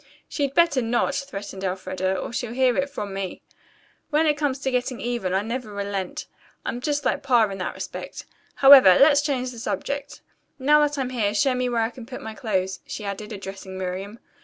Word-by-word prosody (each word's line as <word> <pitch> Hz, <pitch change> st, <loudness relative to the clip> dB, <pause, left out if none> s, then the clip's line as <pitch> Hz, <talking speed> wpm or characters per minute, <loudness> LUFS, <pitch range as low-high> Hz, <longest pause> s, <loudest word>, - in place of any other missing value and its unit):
"She'd 280 Hz, -2 st, -2 dB
better 335 Hz, -6 st, +4 dB
not," 240 Hz, +4 st, +1 dB
threatened 200 Hz, -8 st, -5 dB
Elfreda, 185 Hz, 0 st, -2 dB
"or -, -, -5 dB
she'll 245 Hz, -2 st, -3 dB
hear 255 Hz, -1 st, +3 dB
it 275 Hz, +1 st, 0 dB
from 205 Hz, -6 st, -5 dB
me. 195 Hz, -1 st, -4 dB, 0.7 s
When 310 Hz, +1 st, +2 dB
it 300 Hz, -1 st, +3 dB
comes 290 Hz, -3 st, -1 dB
to 270 Hz, -1 st, -2 dB
getting 250 Hz, 0 st, -1 dB
even, 235 Hz, -6 st, -2 dB
I 190 Hz, +2 st, +1 dB
never 230 Hz, 0 st, -4 dB
relent. 200 Hz, -2 st, -4 dB, 0.4 s
I'm 240 Hz, -, -3 dB
just 290 Hz, +1 st, -1 dB
like -, -, +1 dB
Pa 245 Hz, -4 st, +4 dB
in 195 Hz, -, -6 dB
that 180 Hz, -, -3 dB
respect. -, -, -7 dB, 0.3 s
However, 270 Hz, -10 st, +9 dB
let's 285 Hz, 0 st, +6 dB
change 260 Hz, -4 st, -1 dB
the 235 Hz, -, -9 dB
subject. 280 Hz, +4 st, -4 dB, 0.4 s
Now 295 Hz, +2 st, +4 dB
that 295 Hz, 0 st, +1 dB
I'm 260 Hz, -2 st, -2 dB
here, 215 Hz, -4 st, 0 dB
show 260 Hz, +5 st, +3 dB
me 250 Hz, 0 st, 0 dB
where 235 Hz, -2 st, +1 dB
I 225 Hz, -, -1 dB
can 245 Hz, -2 st, -11 dB
put 255 Hz, -1 st, -7 dB
my 220 Hz, -, -6 dB
clothes," 190 Hz, -4 st, -2 dB
she 210 Hz, -, -6 dB
added, 200 Hz, +2 st, -5 dB
addressing 195 Hz, -2 st, -7 dB
Miriam. 190 Hz, +3 st, -5 dB
240 Hz, 200 wpm, -24 LUFS, 200-275 Hz, 0.7 s, However